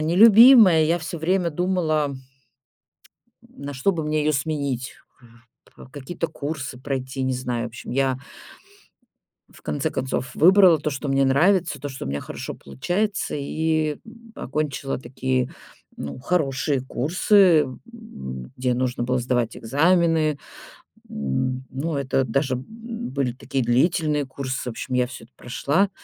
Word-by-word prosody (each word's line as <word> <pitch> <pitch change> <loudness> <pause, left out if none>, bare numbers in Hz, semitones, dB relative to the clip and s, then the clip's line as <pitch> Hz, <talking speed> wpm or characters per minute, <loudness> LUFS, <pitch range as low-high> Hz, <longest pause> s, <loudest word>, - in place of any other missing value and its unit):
нелюбимая, 205 +1 +7
я 165 +3 +2
всё 170 +1 -6
время 175 +1 +1
думала 155 -4 0 1.3
н - - -21 0.2
на 145 - -5
что 135 +10 +1
бы 165 - -3
мне 155 0 0
её 155 +1 +1
сменить, 140 -3 -2 1.0
какие-то 150 +4 -4
курсы 145 -5 -5
пройти, 130 0 -4
не 130 0 0
знаю. 125 -2 -3
В 120 - -4
общем, 115 - -10
я 130 0 +1 1.3
в - - -18
конце 145 +2 -2
концов 130 -1 -3
выбрала 180 -1 +6
то, 150 +1 -2
что 140 +1 -4
мне 135 0 +2
нравится, 160 +3 +2
то, 145 - -4
что 135 -1 -7
у - - -5
меня 70 +1 -3
хорошо - - -7
получается, 185 - -2
и 155 +1 -1 0.4
окончила 140 -1 -3
такие, 130 0 -2 0.5
ну, 70 - -6
хорошие 140 -3 0
курсы, 170 - +3
м, 130 -2 -9 0.8
где 125 -1 0
нужно 125 -1 -1
было 125 +1 0
сдавать 120 -2 -1
экзамены. 160 +3 +2 0.7
М, 125 - -2
ну, 150 +4 -3
это 135 -1 0
даже 130 +2 0
были 220 - -5
такие 130 +1 -3
длительные 150 +3 +2
курсы, 135 0 -4
в 115 - -6
общем, 130 +2 -4
я 125 -1 +2
всё 120 - -10
это 120 - -30
прошла. 145 +10 0
140 Hz, 140 wpm, -23 LUFS, 130-165 Hz, 1.3 s, нелюбимая